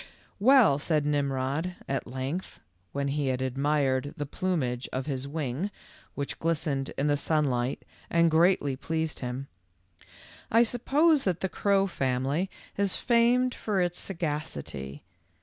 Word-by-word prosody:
"Well," 225 Hz, -, +6 dB
said 150 Hz, -1 st, +1 dB
Mmrod, 145 Hz, +4 st, -1 dB
at 135 Hz, -1 st, -2 dB
length, 135 Hz, +8 st, -4 dB, 0.3 s
when 140 Hz, 0 st, -1 dB
he 145 Hz, 0 st, -1 dB
had 130 Hz, -1 st, 0 dB
admired 135 Hz, +1 st, 0 dB
the 145 Hz, -, -2 dB
plumage 135 Hz, -7 st, -2 dB
of 130 Hz, 0 st, -2 dB
his 135 Hz, -2 st, -3 dB
wing, 150 Hz, +4 st, -2 dB, 0.5 s
which 140 Hz, 0 st, -4 dB
glistened 150 Hz, -4 st, -1 dB
in 140 Hz, -, 0 dB
the 145 Hz, -1 st, +3 dB
sunlight 140 Hz, -4 st, 0 dB, 0.2 s
and 170 Hz, -1 st, +4 dB
greatly 160 Hz, -4 st, +3 dB
pleased 160 Hz, +3 st, -3 dB
him, 125 Hz, +2 st, -4 dB, 0.5 s
" -, -, -23 dB, 0.3 s
I 230 Hz, +2 st, +6 dB
suppose 280 Hz, +6 st, +3 dB
that 180 Hz, -2 st, 0 dB
the 190 Hz, -, 0 dB
crow 200 Hz, 0 st, +2 dB
family 140 Hz, +1 st, -1 dB, 0.3 s
is 200 Hz, -2 st, +1 dB
famed 245 Hz, +1 st, +3 dB
for 205 Hz, -3 st, -1 dB
its 175 Hz, -1 st, 0 dB
sagacity. 145 Hz, -, -4 dB
150 Hz, 135 wpm, -28 LUFS, 135-185 Hz, 0.5 s, Well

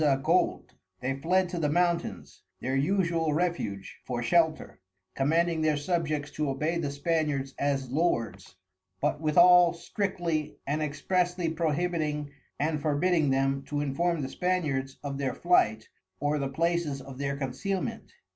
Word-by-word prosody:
_ 135 Hz, -3 st, +2 dB
Gold, 175 Hz, +3 st, +1 dB, 0.3 s
they 130 Hz, +2 st, -1 dB
fled 180 Hz, +7 st, +1 dB
to 175 Hz, -, -3 dB
the 150 Hz, -2 st, +1 dB
Mountains, 170 Hz, +2 st, -1 dB, 0.2 s
(their 130 Hz, +1 st, -2 dB
usual 165 Hz, 0 st, +1 dB
Refuge) 155 Hz, -, -2 dB
for 120 Hz, -2 st, -3 dB
shelter, 160 Hz, -, +1 dB, 0.3 s
commanding 165 Hz, +4 st, +1 dB
their 155 Hz, -1 st, +2 dB
Subjects 150 Hz, -2 st, -1 dB
to 150 Hz, -2 st, -2 dB
obey 155 Hz, +5 st, -1 dB
the 150 Hz, -4 st, -1 dB
Spaniards, 140 Hz, -2 st, -1 dB
as 135 Hz, -3 st, -1 dB
Lords, 115 Hz, -, -1 dB, 0.4 s
but 145 Hz, -, 0 dB
withal 175 Hz, +2 st, +6 dB
strictly 170 Hz, -3 st, -2 dB
and 150 Hz, +2 st, -1 dB
expressly 175 Hz, +3 st, 0 dB
prohibiting 155 Hz, -2 st, -1 dB, 0.3 s
and 150 Hz, 0 st, 0 dB
forbidding 155 Hz, +1 st, +2 dB
them, 135 Hz, +1 st, +1 dB
to 145 Hz, -, -3 dB
inform 150 Hz, +3 st, 0 dB
the 130 Hz, -, -3 dB
Spaniards 145 Hz, -7 st, -1 dB
of 140 Hz, -1 st, -4 dB
their 135 Hz, -2 st, -1 dB
Flight, 110 Hz, -11 st, +2 dB, 0.3 s
or 145 Hz, +1 st, 0 dB
the 135 Hz, -1 st, -2 dB
Places 165 Hz, -1 st, 0 dB
of 135 Hz, 0 st, -10 dB
their 140 Hz, 0 st, -2 dB
Concealment. 180 Hz, +8 st, -3 dB
150 Hz, 140 wpm, -28 LUFS, 135-170 Hz, 0.4 s, withal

